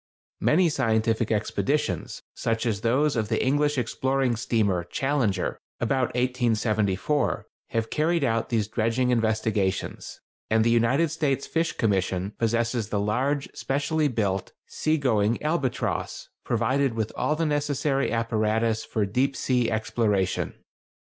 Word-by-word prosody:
Many 175 +3 +4
scientific 115 -4 +1
expeditions, 105 - -1
such 115 +1 -1
as 105 -4 -1
those 135 +6 +2
of 110 -2 -1
the - - 0
English 145 +2 +2
exploring 130 +1 0
steamer 110 -7 0
Challenger, 120 -2 -1 0.2
about 125 +2 +1
1874, 120 0 0 0.2
have 115 -1 -2
carried 160 +1 +1
out 115 -3 0
these 110 -4 0
dredging 115 +3 0
investigations, 110 -4 -1 0.3
and 110 0 +3
the 115 - +3
United 125 +7 +3
States 140 -4 0
Fish 165 0 -1
Commission 95 -2 0
possesses 115 -1 0
the 105 - 0
large, 130 +8 0
specially 145 +3 0
built, 100 -7 -1
sea 155 +1 0
going 115 -5 +1
Albatross, 150 -5 -2
provided 135 -2 +1
with 110 -1 -2
all 150 - 0
the 165 +1 0
necessary 145 -2 0
apparatus 115 -1 0
for 105 -2 -1
deep 130 +7 0
sea 125 -3 +1
exploration. 110 -4 0
115 Hz, 125 wpm, -26 LUFS, 110-140 Hz, 0.3 s, Many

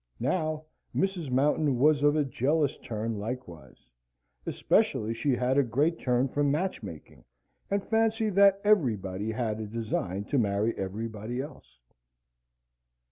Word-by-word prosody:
Now, 155 -3 -1 0.3
Mrs. 190 -6 -1
Mountain 140 +1 +2
was 145 +3 +4
of 145 +1 +4
a 150 - +3
jealous 140 +3 +1
turn 110 -1 -4
likewise; 100 - -7 0.6
especially 110 +2 +1
she 125 +4 0
had 125 +3 +2
a - - +5
great 145 +8 0
turn 125 +1 +1
for 145 +3 -1
match 155 +7 0
making, 85 -8 -10 0.5
and 200 0 0
fancied 225 -1 +1
that 200 0 +6
everybody 110 - +1
had 110 -2 -2
a 110 - -4
design 105 -3 -3
to 135 +6 0
marry 105 +1 +1
everybody 110 +4 -4
else. 135 - -9
130 Hz, 135 wpm, -28 LUFS, 110-155 Hz, 0.6 s, that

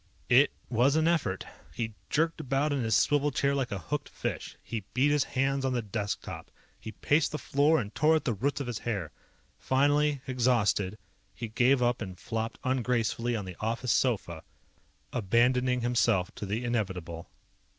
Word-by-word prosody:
It 130 +4 +6 0.2
was 125 +4 +3
an 160 0 +3
effort. 155 - 0 0.3
He 115 -2 -3 0.2
jerked 165 +3 +1
about 135 +3 0
in 140 - 0
his 110 -2 +1
swivel 145 0 +3
chair 140 0 +1
like 135 -3 -1
a 100 - -2
hooked 80 - -4
fish. - - -5
He 115 -3 -4
beat 140 +3 +3
his 145 -2 +3
hands 135 +1 +1
on 130 -1 0
the 120 -2 -1
desk 105 -1 -3
top. - - -8 0.3
He 110 - -8
paced 150 +9 +1
the 150 - -2
floor 150 +2 +2
and 105 -4 -5
tore 155 +2 +4
at 160 - -1
the 120 - +1
roots 135 +9 -1
of 140 - -3
his 120 -4 -4
hair. 100 -9 -3 0.5
Finally, 145 +1 +2
exhausted, 115 -6 +1 0.4
he 115 +3 -5
gave 125 +3 +3
up 120 0 +1
and 95 -4 -6
flopped 115 +4 -4
ungracefully 120 -2 0
on 105 -3 -3
the 90 -2 -8
office 115 +2 -1
sofa, 100 -10 0 0.7
abandoning 125 +3 +2
himself 115 -6 +1
to 105 - -6
the 110 +5 -2
inevitable. 90 -8 -3
120 Hz, 175 wpm, -29 LUFS, 110-140 Hz, 0.7 s, It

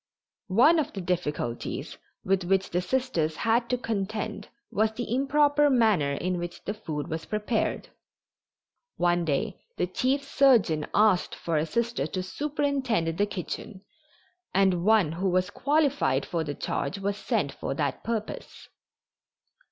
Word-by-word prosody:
One 255 - +5
of 300 - -2
the 195 - -5
difficulties 150 -9 -3 0.3
with 190 0 +2
which 190 +2 +1
the 180 - +1
Sisters 180 -8 0
had 235 +4 +1
to 250 - +1
contend 215 -2 -3 0.2
was 215 +1 +2
the 235 0 -3
improper 290 +2 +3
manner 215 - +3
in 180 +5 -2
which 175 0 -6
the 205 - -2
food 155 -9 -5
was 160 +1 -4
prepared. 215 +1 -1 1.1
One 175 -1 +2
day 165 +6 -1 0.2
the - - +1
chief 260 +10 0
surgeon 240 - +3
asked 210 -4 +3
for 170 - -3
a 155 +2 0
Sister 235 -7 -1
to 185 +3 -3
superintend 265 - -1
the 205 +4 +1
kitchen, 195 +1 -6 0.7
and 190 -3 +3
one 210 -6 +4
who 185 +4 -1
was 185 +1 +1
qualified 285 - +1
for 170 -2 -2
the 145 -2 -4
charge 140 +8 -2
was 200 +1 -2
sent 205 - -1
for - - -4
that - - -2
purpose. 225 -2 -5
200 Hz, 145 wpm, -27 LUFS, 175-240 Hz, 1.1 s, One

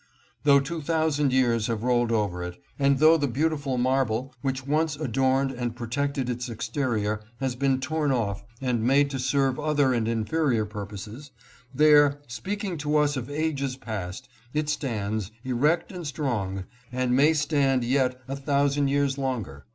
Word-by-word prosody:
Though 140 -1 +7
two 160 +4 -4
thousand 155 -2 +1
years 120 -4 +2
have 115 -1 -2
rolled 120 -1 +2
over 105 -6 0
it, 90 0 -6 0.2
and 140 0 +3
though 155 +3 +6
the 145 -2 0
beautiful 145 0 -1
marble 130 0 0
which 130 -1 -2
once 155 +1 +1
adorned 135 -1 +1
and 120 -2 -4
protected 135 +3 -2
its 125 0 -3
exterior 110 -2 -2 0.2
has 135 -2 -1
been 135 0 +1
torn 150 +2 0
off 105 -6 -1 0.2
and 125 -4 0
made 140 +4 +3
to 135 - -3
serve 135 +1 +1
other 145 -3 +2
and 115 -2 0
inferior 115 +1 +1
purposes, 105 +7 -8 0.4
there, 145 0 +5
speaking 190 - -4
to 150 +1 +1
us 150 -1 +2
of 125 -1 -4
ages 145 -3 -1
past, 105 -7 -6 0.3
it 150 0 0
stands, 110 -8 -2
erect 150 +7 +1
and 175 -4 -6
strong, 110 - -2 0.3
and 125 0 0
may 145 +4 +5
stand 145 -4 +2
yet 130 0 +1
a 135 - -3
thousand 140 0 +1
years 140 0 +1
longer. 110 - -3
135 Hz, 160 wpm, -26 LUFS, 120-145 Hz, 0.4 s, Though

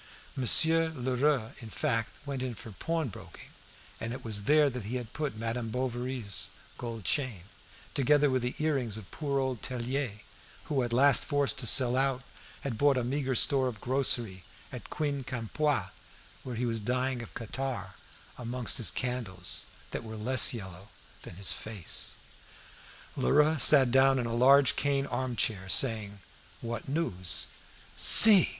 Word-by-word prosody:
Monsieur 160 +6 +3
Lheureux, 130 -3 -2
in 115 - -10
fact, 115 +1 -3
went 140 -2 -5
in 125 -2 -5
for 110 - -11
pawnbroking, 155 - -7 0.5
and 115 +1 -6
it 125 - -10
was 105 -3 -1
there 150 0 +3
that 125 -5 -6
he 115 +5 -6
had 120 -3 -7
put 150 -7 -5
Madame 115 +1 -4
Bovary's 125 -4 -3 0.3
gold 115 -3 -7
chain, 130 - -1 0.5
together 145 +2 +2
with 130 -2 -1
the 125 +1 -4
earrings 135 -8 -2
of 100 -2 -12
poor 140 -3 -4
old 130 -4 -3
Tellier, 125 -3 -5 0.4
who, 140 -3 -2
at 120 -1 -4
last 135 +3 +4
forced 145 -2 -1
to 125 - -1
sell 125 +1 +2
out, 135 -1 -1 0.4
had 120 -6 -6
bought 145 -2 +2
a 125 - -1
meagre 135 +1 -3
store 135 +1 +3
of 115 -4 -7
grocery 120 -7 0 0.3
at - - -10
Quincampoix, 140 0 -3 0.5
where 125 -2 -7
he 120 +2 -3
was 115 -1 -2
dying 125 +3 -3
of 115 - -13
catarrh 115 -4 -6 0.5
amongst 125 0 -2
his 115 - +1
candles, 110 -8 -2 0.2
that - - -6
were 110 -1 -9
less 120 +2 +4
yellow 95 -4 -10 0.3
than - - -12
his 95 +1 -2
face. 105 -6 -5 1.0
Lheureux 150 - +1
sat 135 -3 +5
down 135 +1 +3
in 125 - -3
a 115 - -4
large 135 +3 +4
cane 140 -1 -1
arm 130 -3 -4
chair, 95 -5 -2
saying: 105 -4 0 0.4
"What 115 +1 -7
news?" 95 - 0 0.5
"See!" 210 -5 +11
125 Hz, 155 wpm, -28 LUFS, 115-135 Hz, 1.0 s, See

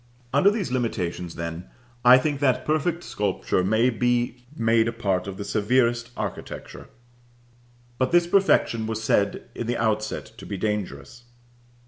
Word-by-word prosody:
Under 145 +8 +5
these 205 - -2
limitations, 90 -8 -2
then, 85 +1 -5 0.4
I 125 +1 +9
think 145 +1 -1
that 135 -3 +1
perfect 160 +3 0
sculpture 100 -2 -1
may 110 +6 +3
be 120 +1 -1
made 115 0 +3
a - - 0
part 100 -5 -1
of 95 -1 -6
the 100 - -4
severest 120 +2 +1
architecture; - - -6 1.1
but 130 0 +1
this 175 0 +5
perfection 175 - +2
was 110 0 -3
said 100 -2 +1
in 120 - -5
the 120 0 -1
outset 110 -1 -1
to - - -10
be 100 - -4
dangerous. 105 - -4
115 Hz, 145 wpm, -25 LUFS, 105-130 Hz, 1.1 s, I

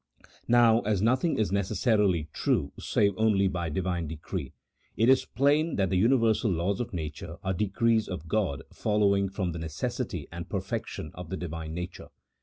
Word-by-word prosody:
Now, 120 -1 +5
as 105 -3 0
nothing 130 +8 +2
is 110 -3 0
necessarily 100 - +1
true 70 - 0
save 100 -1 +2
only 105 -3 +3
by 85 -3 -2
Divine 90 0 -2
decree, 80 -1 -5 0.5
it 115 +3 +4
is 130 - +5
plain 145 +5 +2
that 95 -2 0
the - - +2
universal 115 +1 +3
laws 90 +2 0
of 120 - -3
nature 80 -1 -6
are 95 - 0
decrees 110 +4 +1
of 85 -3 -6
God 90 -8 -1
follow 105 -1 +2
ing 100 0 0
from 95 -2 -2
the 85 - -5
necessity 90 - -4
and 85 +2 -7
perfection 100 -3 -4
of 90 -2 -9
the 95 - -3
Divine 80 -2 -5
nature. 90 +1 -6
95 Hz, 170 wpm, -28 LUFS, 85-110 Hz, 0.5 s, Now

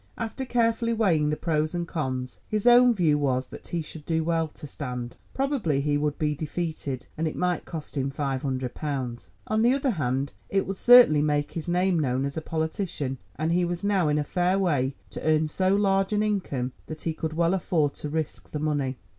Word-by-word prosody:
After 230 +3 -4
carefully 230 -1 +1
weighing 170 -10 +2
the 150 - +1
pros 155 0 -1
and 170 -1 -2
cons, 130 -6 -3
his 215 0 -2
own 245 0 +7
view 165 -9 +2
was 130 -2 +1
that - - -10
he 170 -2 -2
should 155 0 -10
do 160 +1 0
well 165 0 +1
to 150 - -12
stand. 125 -4 -5 0.2
Probably 265 - 0
he 145 +1 +1
would 145 0 0
be 150 -1 0
defeated, 155 -3 -4
and 160 - +1
it 155 - -4
might 180 -1 0
cost 155 -3 -7
him 135 -1 0
five 135 -1 -2
hundred 130 -3 -2
pounds. 130 -6 -4 0.2
On 215 0 +1
the 240 +3 +4
other 275 -1 +1
hand 135 - -1 0.2
it 195 0 +1
would 195 0 -4
certainly 240 -12 +8
make 145 -1 0
his 165 -1 -5
name 180 0 +2
known 130 -2 0
as 140 - -4
a 160 - -2
politician, 160 -4 -3 0.2
and 155 +4 -1
he 175 +1 +3
was 175 +1 -2
now 195 -5 +2
in 150 0 +2
a 150 - +1
fair 180 +5 +1
way 145 -8 +1 0.2
to - - -6
earn 155 0 +3
so 185 +5 +1
large 195 -1 +2
an 210 0 +2
income 165 -12 -1 0.2
that 155 0 -7
he 165 - -1
could 160 0 -4
well 170 +2 +2
afford 160 -6 +1
to 150 - -6
risk 155 0 -4
the - - -4
money. 145 -4 -1
160 Hz, 215 wpm, -26 LUFS, 145-190 Hz, 0.2 s, certainly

